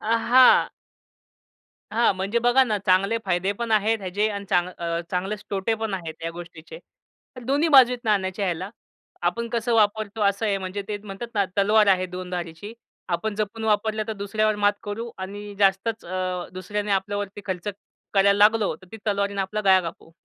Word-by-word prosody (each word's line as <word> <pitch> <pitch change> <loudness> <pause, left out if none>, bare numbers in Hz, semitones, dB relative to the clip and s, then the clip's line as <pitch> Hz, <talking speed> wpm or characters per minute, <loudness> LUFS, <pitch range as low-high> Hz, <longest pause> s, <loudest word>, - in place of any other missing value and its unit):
अ, 230 +1 +1
हां. 255 +1 +7 1.2
हां 230 -1 +3
म्हणजे 195 +5 0
बघा 245 +3 +4
ना 215 -3 0
चांगले 195 +5 +3
फायदे 185 +1 0
पण 230 +2 -5
आहेत 220 +1 +2
ह्याचे 200 +3 -1
आणि 200 -1 -5
चांग 180 -1 +2
अ, 170 0 -2
चांगलेच 195 +3 -3
तोटे 200 +3 0
पण 220 -2 -3
आहेत 165 -4 -5
ह्या 165 - -3
गोष्टीचे. 170 - -10 0.6
तर 250 - -9
दोन्ही 285 +6 +1
बाजू 265 -4 +7
आहेत 245 0 -6
नाण्याच्या 200 -2 0
ह्याला. 185 +2 -3 0.5
आपण 230 +7 -1
कसं 235 0 -1
वापरतो 215 0 +1
असं 200 +2 +1
आहे 200 -1 +1
म्हणजे 190 +1 -5
ते 210 - -2
म्हणतात 195 +4 -6
ना 200 - +2
"तलवार 210 +2 +4
आहे 185 -1 +3
दोन 180 0 -7
धारीची. 175 +3 -6 0.4
आपण 205 +4 -2
जपून 215 +1 -3
वापरलं 215 0 +1
तर 220 - -1
दुसऱ्यावर 215 +1 0
मात 205 0 +3
करू 225 +3 -5
आणि 205 +2 -7
जास्तच 200 +3 +1
अ, 185 0 -3
दुसऱ्याने 205 +3 -4
आपल्यावरती 205 +1 -2
खर्च 185 +1 -3 0.5
करायला 200 0 +5
लागलो 210 0 +4
तर 185 - -19
ती 225 - -6
तलवारीने 200 -1 0
आपला 200 +3 -2
गळा 190 -2 +5
कापू." 165 -1 -8
205 Hz, 180 wpm, -24 LUFS, 190-220 Hz, 1.2 s, हां